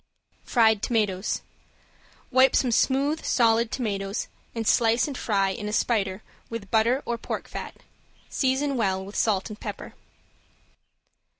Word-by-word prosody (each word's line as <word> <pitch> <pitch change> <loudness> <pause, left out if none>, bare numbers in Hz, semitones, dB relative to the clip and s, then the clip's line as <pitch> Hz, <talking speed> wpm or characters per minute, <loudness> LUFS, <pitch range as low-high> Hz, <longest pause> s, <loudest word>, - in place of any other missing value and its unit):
~FRIED 220 -4 +3
TOMATOES~ 210 -5 0 0.9
Wipe 260 +1 +5
some 250 - +2
smooth 280 +6 +1
solid 230 -1 +3
tomatoes 200 -4 -3 0.3
and 225 -1 -2
slice 230 +1 +3
and 285 - -5
fry 200 -5 +1
in 210 +1 -5
a - - -4
spider 210 -3 0 0.3
with 220 -4 -7
butter 235 +5 +2
or 235 -1 -2
pork - - -5
fat. - - -7 0.5
Season 270 +1 0
well 190 -4 0
with 200 - -10
salt 205 -1 +1
and 210 - -9
pepper. - - -7
225 Hz, 130 wpm, -26 LUFS, 200-245 Hz, 0.9 s, Wipe